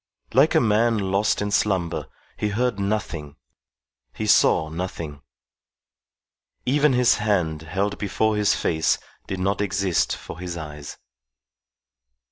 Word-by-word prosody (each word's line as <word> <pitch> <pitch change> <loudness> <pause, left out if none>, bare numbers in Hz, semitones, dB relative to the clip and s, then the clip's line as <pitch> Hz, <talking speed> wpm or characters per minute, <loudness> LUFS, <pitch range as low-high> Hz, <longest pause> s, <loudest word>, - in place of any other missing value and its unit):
Like 135 +6 +4
a - - +7
man 115 +1 +3
lost 100 +1 +1
in 105 - -2
slumber, 95 -5 0 0.3
he 105 - -1
heard 115 0 0
nothing, 100 -8 -3 0.8
he - - -3
saw 80 - +4
nothing. 80 -3 -5 1.4
Even 145 +2 +3
his 125 -1 +4
hand 90 -7 0
held 95 +6 -2
before 110 +2 0
his 105 -1 +2
face 80 -1 +1 0.3
did 95 - -4
not 100 +2 0
exist 95 -3 +1
for 85 - -10
his 90 -1 -5
eyes. 75 -2 -8
100 Hz, 120 wpm, -23 LUFS, 85-105 Hz, 1.4 s, a